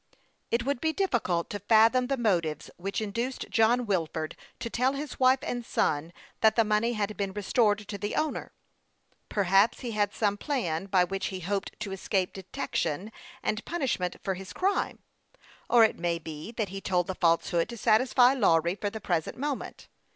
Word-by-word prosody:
It 235 Hz, +1 st, 0 dB
would 275 Hz, -2 st, -1 dB
be 320 Hz, 0 st, +1 dB
difficult 235 Hz, -, 0 dB
to 205 Hz, -, -3 dB
fathom 225 Hz, +5 st, +4 dB
the 275 Hz, +1 st, 0 dB
motives 170 Hz, -, 0 dB
which 195 Hz, +4 st, -3 dB
induced 235 Hz, +5 st, -3 dB
John 235 Hz, +2 st, +3 dB
Wilford 165 Hz, -5 st, -2 dB, 0.2 s
to -, -, -4 dB
tell 250 Hz, +3 st, +1 dB
his 280 Hz, 0 st, -6 dB
wife 260 Hz, 0 st, +5 dB
and 245 Hz, -1 st, -3 dB
son 160 Hz, -6 st, 0 dB, 0.3 s
that 220 Hz, -1 st, +4 dB
the 230 Hz, -, +5 dB
money 215 Hz, +2 st, +1 dB
had 215 Hz, -1 st, -2 dB
been 195 Hz, -2 st, -3 dB
restored 210 Hz, 0 st, +1 dB
to 205 Hz, -2 st, -5 dB
the 205 Hz, +2 st, -3 dB
owner. 310 Hz, -1 st, -2 dB, 0.8 s
Perhaps 195 Hz, +2 st, +3 dB
he 245 Hz, -3 st, -4 dB
had 205 Hz, -2 st, +1 dB
some 205 Hz, -2 st, 0 dB
plan 200 Hz, -, -2 dB
by 190 Hz, -2 st, +4 dB
which 195 Hz, +1 st, -2 dB
he 185 Hz, -1 st, -5 dB
hoped 195 Hz, +3 st, -3 dB
to 205 Hz, -2 st, -4 dB
escape 190 Hz, -1 st, -1 dB
de 190 Hz, -, -7 dB
tection 180 Hz, +1 st, -3 dB, 0.3 s
and 215 Hz, +1 st, -1 dB
punishment 260 Hz, -, -1 dB
for 195 Hz, -, 0 dB
his 190 Hz, 0 st, -8 dB
crime; 390 Hz, +2 st, -1 dB, 0.7 s
or 240 Hz, -2 st, +7 dB
it 220 Hz, -, +2 dB
may 170 Hz, 0 st, 0 dB
be 160 Hz, +3 st, -8 dB
that 220 Hz, -4 st, -2 dB
he 195 Hz, +1 st, -6 dB
told 180 Hz, -2 st, +1 dB
the 190 Hz, -, -3 dB
falsehood 170 Hz, +1 st, +1 dB
to 235 Hz, -, -7 dB
satisfy 245 Hz, +4 st, +4 dB
Lawry 170 Hz, -, +3 dB
for 205 Hz, +1 st, -3 dB
the 220 Hz, -, -7 dB
present 170 Hz, -5 st, -1 dB
moment. 285 Hz, 0 st, -4 dB
205 Hz, 180 wpm, -28 LUFS, 185-240 Hz, 0.8 s, or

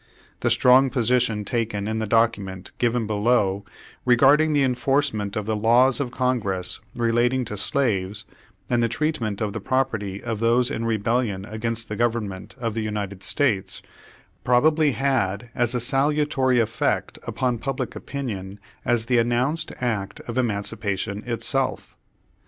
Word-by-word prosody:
The -, -, +1 dB
strong 130 Hz, +2 st, +5 dB
position 120 Hz, -4 st, +1 dB
taken 110 Hz, -3 st, -2 dB
in 110 Hz, 0 st, -1 dB
the 110 Hz, -, -2 dB
document 100 Hz, -4 st, 0 dB
given 120 Hz, -1 st, +1 dB
below 105 Hz, -2 st, +1 dB, 0.4 s
regarding 140 Hz, +5 st, +5 dB
the 145 Hz, -2 st, +3 dB
enforcement 130 Hz, -5 st, 0 dB
of 105 Hz, -, -2 dB
the 110 Hz, 0 st, -1 dB
laws 120 Hz, +5 st, +4 dB
of 140 Hz, -3 st, -1 dB
Congress 115 Hz, -8 st, -1 dB, 0.2 s
relating 120 Hz, +2 st, +1 dB
to 105 Hz, -, -5 dB
slaves, 105 Hz, -5 st, 0 dB, 0.4 s
and 120 Hz, -1 st, +1 dB
the 115 Hz, -, +2 dB
treatment 115 Hz, -6 st, -2 dB
of 105 Hz, -2 st, -1 dB
the 110 Hz, -, -3 dB
property 110 Hz, -6 st, -1 dB
of 115 Hz, -3 st, -3 dB
those 120 Hz, +3 st, +2 dB
in 115 Hz, -, -2 dB
rebellion 110 Hz, -2 st, 0 dB
against 115 Hz, +1 st, -3 dB
the 105 Hz, -, -4 dB
Government 110 Hz, -5 st, -2 dB
of 115 Hz, -3 st, -2 dB
the 115 Hz, -, -2 dB
United 100 Hz, -3 st, -4 dB
States, 115 Hz, -9 st, 0 dB, 0.6 s
probably 150 Hz, +4 st, +3 dB
had 120 Hz, -5 st, -1 dB
as 120 Hz, -1 st, +2 dB
salutary 135 Hz, -1 st, +2 dB
effect 110 Hz, -1 st, -1 dB
upon 125 Hz, -3 st, -1 dB
pub 135 Hz, +2 st, -3 dB
lic -, -, -4 dB
opinion 105 Hz, -8 st, -5 dB, 0.2 s
as 120 Hz, -2 st, +1 dB
the 120 Hz, 0 st, +3 dB
announced 125 Hz, +7 st, +1 dB
act 105 Hz, -5 st, -2 dB
of 115 Hz, -, -7 dB
emancipation 105 Hz, -3 st, -2 dB
itself. 130 Hz, +3 st, -2 dB
115 Hz, 140 wpm, -24 LUFS, 105-130 Hz, 0.6 s, strong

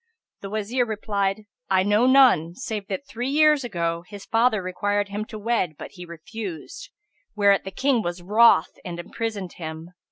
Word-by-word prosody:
The 195 Hz, -, -6 dB
Wazir 215 Hz, +4 st, -1 dB
replied, 205 Hz, -2 st, -2 dB, 0.3 s
"I 190 Hz, -1 st, +3 dB
know 210 Hz, +5 st, +3 dB
none, 245 Hz, -, +5 dB
save 215 Hz, -4 st, -5 dB
that, 200 Hz, +8 st, -4 dB
three 245 Hz, 0 st, -4 dB
years 300 Hz, 0 st, +4 dB
ago, 170 Hz, -6 st, -2 dB
his 205 Hz, -2 st, -10 dB
father 225 Hz, -3 st, +2 dB
required 205 Hz, +2 st, -1 dB
him 205 Hz, +2 st, -4 dB
to 215 Hz, -, -9 dB
wed, 210 Hz, -7 st, -1 dB
but -, -, -9 dB
he 180 Hz, -2 st, -11 dB
refused; 195 Hz, -, -8 dB, 0.5 s
whereat 200 Hz, -2 st, +3 dB
the -, -, -4 dB
King 250 Hz, +5 st, +1 dB
was 175 Hz, -2 st, -4 dB
wroth 220 Hz, +5 st, +4 dB
and 175 Hz, -1 st, -6 dB
imprisoned 200 Hz, 0 st, -5 dB
him. 160 Hz, 0 st, -7 dB
205 Hz, 165 wpm, -24 LUFS, 180-230 Hz, 0.5 s, none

